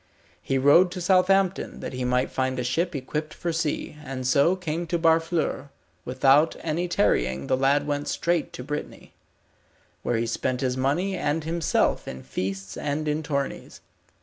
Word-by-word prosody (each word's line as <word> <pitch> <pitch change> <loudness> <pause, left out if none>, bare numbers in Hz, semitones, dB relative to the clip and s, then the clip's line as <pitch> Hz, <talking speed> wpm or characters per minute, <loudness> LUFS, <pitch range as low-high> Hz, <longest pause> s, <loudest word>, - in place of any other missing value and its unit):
He 135 - -1
rode 145 +7 +6
to 185 - -5
Southampton, 190 +1 +2
that - - -6
he 125 0 -3
might 125 +1 +1
find 130 -1 -1
a 125 - -1
ship 165 +8 -1
equipped 150 +3 -4
for 170 -1 -3
sea, 160 -2 -2
and 130 -1 -5
so 140 +8 +4
came 170 -2 -3
to 170 +1 0
Barfleur. 165 -3 +1 0.4
Without 135 +5 +4
any 170 +2 -1
tarrying 65 - +1
the - - +2
lad 140 +2 +2
went 145 0 -2
straight 170 -2 0
to 125 - -7
Brittany, 150 +3 -6 0.9
where 120 - 0
he 115 - 0
spent 125 +2 -2
his 130 -1 0
money 150 +9 0
and 150 0 -1
himself 165 +1 0
in 65 - -7
feasts 95 0 -4
and 150 +1 -2
in 150 +1 0
tourneys. 140 -3 -4
145 Hz, 165 wpm, -25 LUFS, 130-165 Hz, 0.9 s, rode